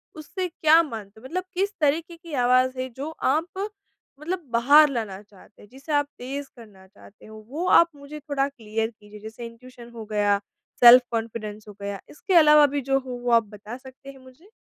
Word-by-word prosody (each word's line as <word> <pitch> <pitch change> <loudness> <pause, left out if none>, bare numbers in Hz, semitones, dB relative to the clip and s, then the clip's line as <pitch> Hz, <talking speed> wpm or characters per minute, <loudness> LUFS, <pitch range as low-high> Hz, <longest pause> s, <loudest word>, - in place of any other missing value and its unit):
उसे 365 +4 -5
क्या 325 -1 +4
मानते 220 -7 -9
हो? - - -15
मतलब 360 +7 -3
किस 395 +3 -1
तरीके 320 +4 0
की 335 -3 -12
आवाज़ 255 +1 +3
है, 255 0 -3
जो 275 +6 -7
आप 345 +8 -1 0.5
मतलब 345 +3 -4
बाहर 285 +6 +6
लाना 215 -6 -4
चाहते 205 0 -20
हो, 205 - -16
जिसे 275 +4 -10
आप 290 0 +2
तेज़ 275 +3 -6
करना 210 -5 -16
चाहते 200 +1 -19
हो? 215 0 -12
वो 325 +6 -4
आप 335 -2 +6
मुझे 285 +2 -10
थोड़ा 285 -2 -1
क्लियर 225 -3 -4
कीजिए। 210 -2 -15
जैसे 220 +3 -9
इंट्यूशन 240 +1 -13
हो 220 -1 -8
गया, 205 -1 +2 0.4
सेल्फ-कॉन्फिडेंस 230 -3 +4
हो 210 - -10
गया, 200 -1 -5
इसके 375 +5 -4
अलावा 300 -2 +7
भी 285 - 0
जो 270 +1 +1
हो, 260 -1 -9
वो 245 0 -3
आप 230 -1 +5
बता 210 +3 -10
सकते 265 +1 -14
हैं 270 - -17
मुझे? 260 +7 -19
255 Hz, 195 wpm, -24 LUFS, 220-300 Hz, 0.5 s, अलावा